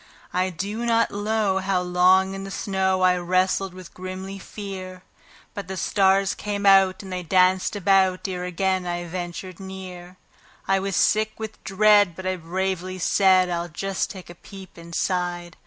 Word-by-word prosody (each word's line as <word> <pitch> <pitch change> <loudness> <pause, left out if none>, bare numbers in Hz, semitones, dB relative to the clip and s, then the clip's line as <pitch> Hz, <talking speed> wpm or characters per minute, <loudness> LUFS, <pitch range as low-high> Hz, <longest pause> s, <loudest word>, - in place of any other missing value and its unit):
I 185 +1 +1
do 200 +6 -4
not 230 -1 +2
know 205 -1 0
how 190 -1 0
long 180 +2 +3
in 195 0 -6
the 195 - -7
snow 190 -1 0
I 180 0 +4
wrestled 185 +1 0
with 185 -2 -11
grisly 185 +1 -7
fear; 185 -2 -8 0.5
But 200 -2 -6
the 190 0 -5
stars 195 +1 +2
came 205 -1 -4
out 195 -1 +5
and 190 -1 -7
they 180 - -3
danced 185 +3 +2
about 190 -1 +2
ere 180 -1 -4
again 185 +1 -1
I 175 0 -3
ventured 175 +1 -6
near; 185 -2 -9 0.5
I 195 0 +3
was 195 -1 -3
sick 215 +3 +2
with 220 -1 -8
dread, 205 -2 +4
but 190 - -8
I 185 0 0
bravely 185 +2 -3
said: 185 0 +4
"I'll 175 0 -3
just 195 +3 -3
take 185 -3 -10
a - - -10
peep 190 +1 -13
inside. 175 +1 -3
185 Hz, 165 wpm, -24 LUFS, 180-195 Hz, 0.5 s, out